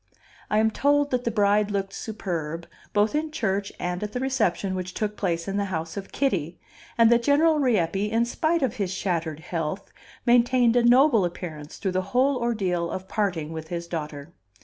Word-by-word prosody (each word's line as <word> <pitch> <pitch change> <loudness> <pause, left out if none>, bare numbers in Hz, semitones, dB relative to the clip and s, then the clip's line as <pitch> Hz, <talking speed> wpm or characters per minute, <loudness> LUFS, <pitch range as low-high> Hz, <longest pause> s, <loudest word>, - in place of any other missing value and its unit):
I 210 - +2
am 220 +1 +3
told 285 +3 +2
that 250 -1 0
the - - +2
bride 210 -1 +2
looked 195 -1 -2
superb, 170 -7 -4 0.3
both 210 +1 +2
in 310 +1 -1
church 200 -8 -1
and 180 0 -3
at 210 0 -4
the 250 - -2
reception 225 -8 0
which 185 -1 -5
took 210 -1 -2
place 170 -4 -2
in 195 +1 -2
the 200 - 0
house 165 -3 -4
of 200 -1 -7
Kitty; 180 - -1 0.4
and 230 0 +6
that 235 0 +5
General 300 +4 +3
Rieppe, 210 - +1
in 230 +1 +2
spite 315 +6 0
of 255 -2 -1
his 195 -4 -1
shattered 165 -5 -2
health, 165 +1 -4 0.3
maintained 245 0 +4
a 245 - +5
noble 245 -1 +5
appearance 160 -4 -6
through 195 - -2
the 185 0 0 0.2
whole 270 +1 +4
ordeal 190 -8 -1
of 190 +2 -5
parting 175 -8 -2
with 160 0 -6
his 170 0 -4
daughter. 155 -2 -6
200 Hz, 190 wpm, -25 LUFS, 175-240 Hz, 0.4 s, and